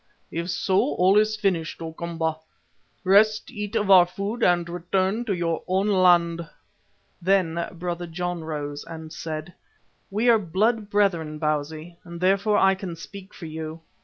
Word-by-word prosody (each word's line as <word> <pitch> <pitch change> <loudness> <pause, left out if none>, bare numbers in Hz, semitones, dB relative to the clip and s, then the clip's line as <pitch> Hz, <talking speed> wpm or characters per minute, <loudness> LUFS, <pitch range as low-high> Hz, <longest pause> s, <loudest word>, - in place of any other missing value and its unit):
"If 170 +2 -3
so, 185 -5 +1
all 185 +5 +4
is 215 0 +1
finished, 190 -6 -1
O 165 -1 -6
Komba. 165 -1 -3 0.7
Rest, 215 +4 +4
eat 210 -3 -5
of 205 -1 +1
our 180 -2 +8
food 200 +6 -4
and 175 -4 +3
return 185 +6 -1
to 210 - 0
your 165 -2 -1
own 190 +2 +1
land." 170 -4 +3 0.7
Then 170 -2 +1
Brother 175 0 -4
John 175 0 -4
rose 145 -2 -5
and 160 -1 -9
said: 160 +1 -6 0.6
"We 215 +5 0
are 230 -2 +6
blood 210 +4 0
brethren, 175 -7 +1
Bausi, 155 +2 -3
and 170 -1 -9
therefore 195 +3 +2
I 195 0 +5
can 190 -3 -6
speak 195 +3 -11
for 170 - -10
you. 160 0 -6
175 Hz, 155 wpm, -24 LUFS, 165-195 Hz, 0.7 s, our